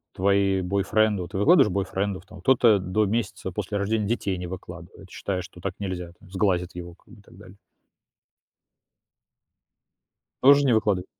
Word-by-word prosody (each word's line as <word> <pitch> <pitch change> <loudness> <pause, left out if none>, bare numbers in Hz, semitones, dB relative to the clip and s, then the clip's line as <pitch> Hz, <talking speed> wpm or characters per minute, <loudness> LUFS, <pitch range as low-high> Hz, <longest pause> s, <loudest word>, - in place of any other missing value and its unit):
твои 100 0 +2
бойфренды. 100 +1 0
Ты 95 - -6
выкладываешь 125 - +5
бойфрендов 95 0 -2
там? 100 - -13
Кто-то 120 -6 +4
до 95 +4 0
месяца 105 -2 -3
после 105 +2 -4
рождения 105 +2 -1
детей 100 -4 -1
не 90 0 -6
выкладывает, 95 +1 -10
считая, 95 -2 -4
что 90 0 -12
так 95 +1 -4
нельзя, 90 -3 -5
там, 95 - -19
сглазят 95 -2 0
его, 85 -1 -8
как 95 - -21
бы, 115 - -15
и - - -20
так - - -19
далее. 95 0 -15 2.8
Тоже 140 +2 +6
не 130 - +3
выкладыва 105 -4 +1
100 Hz, 155 wpm, -25 LUFS, 90-105 Hz, 2.8 s, Тоже